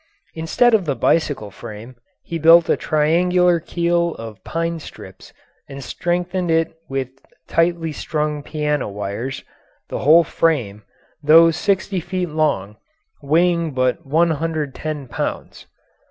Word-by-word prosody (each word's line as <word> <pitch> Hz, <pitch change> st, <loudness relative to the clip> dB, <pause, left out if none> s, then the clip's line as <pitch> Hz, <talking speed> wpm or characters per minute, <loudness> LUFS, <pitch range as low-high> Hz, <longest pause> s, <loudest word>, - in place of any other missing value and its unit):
Instead 165 Hz, +9 st, +2 dB
of 210 Hz, -5 st, +3 dB
the 140 Hz, -3 st, -1 dB
bicycle 135 Hz, -5 st, 0 dB
frame, 115 Hz, +4 st, -10 dB, 0.3 s
he 165 Hz, -2 st, -5 dB
built 165 Hz, +1 st, +6 dB
a -, -, +3 dB
triangular 175 Hz, +3 st, +2 dB
keel 170 Hz, 0 st, 0 dB
of 110 Hz, -3 st, -10 dB
pine 165 Hz, 0 st, -3 dB
strips -, -, -12 dB, 0.4 s
and 140 Hz, 0 st, -8 dB
strengthened 175 Hz, +4 st, -2 dB
it 165 Hz, 0 st, +1 dB, 0.2 s
with 135 Hz, -1 st, -2 dB, 0.4 s
tightly 165 Hz, -1 st, +1 dB
strung 150 Hz, -1 st, -3 dB
piano 150 Hz, -4 st, -2 dB
wires, 105 Hz, +6 st, -5 dB, 0.5 s
the -, -, -4 dB
whole 160 Hz, +5 st, +6 dB
frame, 125 Hz, -13 st, 0 dB, 0.4 s
though 165 Hz, +3 st, +7 dB
sixty 195 Hz, +1 st, -1 dB
feet 180 Hz, +1 st, -3 dB
long, 145 Hz, -10 st, -1 dB, 0.4 s
weighing 165 Hz, +1 st, +1 dB
but 130 Hz, +5 st, 0 dB
110 155 Hz, -2 st, -1 dB
pounds. -, -, -5 dB
160 Hz, 120 wpm, -20 LUFS, 135-170 Hz, 0.5 s, though